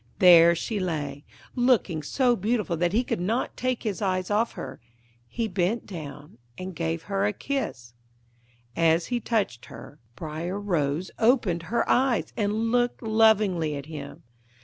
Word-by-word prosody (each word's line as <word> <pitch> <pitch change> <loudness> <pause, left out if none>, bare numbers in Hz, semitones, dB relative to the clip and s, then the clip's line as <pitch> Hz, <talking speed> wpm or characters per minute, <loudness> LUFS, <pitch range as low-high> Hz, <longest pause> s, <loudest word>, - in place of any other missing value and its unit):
There 170 -2 +7
she 210 +5 -3
lay, 150 -6 -3 0.3
looking 245 -10 +2
so 245 - +2
beautiful 210 -3 -1
that 175 +1 0
he 230 +5 +2
could 240 - -2
not 220 +8 -1
take 255 -1 -2
his 215 -2 -3
eyes 185 -1 -1
off 220 +3 +1
her; - - -7 0.5
he 230 - -2
bent 190 +3 -1
down 150 - -9 0.2
and 185 -1 -6
gave 165 0 -2
her 200 0 0
a - - +1
kiss. 145 - -4 0.8
As 165 0 +3
he 240 - +1
touched 205 - -1
her, 145 - -12 0.2
Briar 165 +6 -4
Rose 170 -4 -1
opened 220 -8 +3
her 235 - 0
eyes 255 -2 +2
and 220 +1 0
looked 245 0 +1
lovingly 215 -8 +3
at 140 -1 -6
him. 150 -3 -9
190 Hz, 150 wpm, -26 LUFS, 165-225 Hz, 0.8 s, There